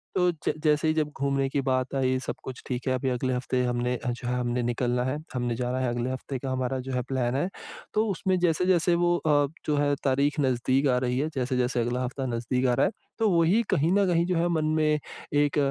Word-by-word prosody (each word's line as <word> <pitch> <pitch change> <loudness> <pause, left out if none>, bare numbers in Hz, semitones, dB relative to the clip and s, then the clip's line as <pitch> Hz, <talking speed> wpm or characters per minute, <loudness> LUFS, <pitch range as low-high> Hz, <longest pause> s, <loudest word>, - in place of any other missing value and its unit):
तो 180 -1 +3
ज 160 - -2
जैसे 150 0 +3
ही 155 - +3
जब 155 -2 0
घूमने 140 0 +1
की 140 0 0
बात 130 0 -1
आई 130 -1 +1
सब - - -3
कुछ 130 -1 -7
ठीक 130 +1 -3
है 130 - +2
अभी 130 +1 -1
अगले 130 +1 -1
हफ़्ते 125 0 0
हमने 125 0 0
अ, 125 - -3
जो 120 0 -6
है 125 - 0
हमने 120 0 -1
निकलना 120 +1 0
है, 130 +3 -1 0.2
हमने 120 -2 -1
जाना 125 +1 -2
है 130 -2 0
अगले 120 +1 -2
हफ़्ते 130 +1 -4
का 135 0 -4
हमारा 130 0 -1
जो 130 +1 -6
है 125 - 0
प्लान 130 -2 0
है। 160 +7 0 0.4
तो 215 +1 +2
उसमें 185 +1 0
जैसे-जैसे 175 0 +2
वो 175 0 +2
अ, 145 -3 +2 0.2
जो 150 - +1
है 145 0 +2
तारीख 140 +2 +1
नज़दीक 130 +1 +2
आ 125 - +3
रही 125 0 0
है, 150 +3 0
जैसे-जैसे 125 -1 0
अगला 120 +2 -1
हफ्ता 130 +2 -3
नज़दीक 125 +1 -1
आ 125 - +3
रहा - - +3
है, - - 0 0.3
तो 220 -1 +3
वो 170 -3 +3
ही 200 +8 +4
कहीं 155 +4 +2
न 200 -1 +4
कहीं 170 -1 +2
जो 180 0 0
है 170 - +2
मन 160 -2 +1
में 155 -1 +2 0.3
एक 145 0 +2
130 Hz, 245 wpm, -27 LUFS, 125-155 Hz, 0.4 s, ही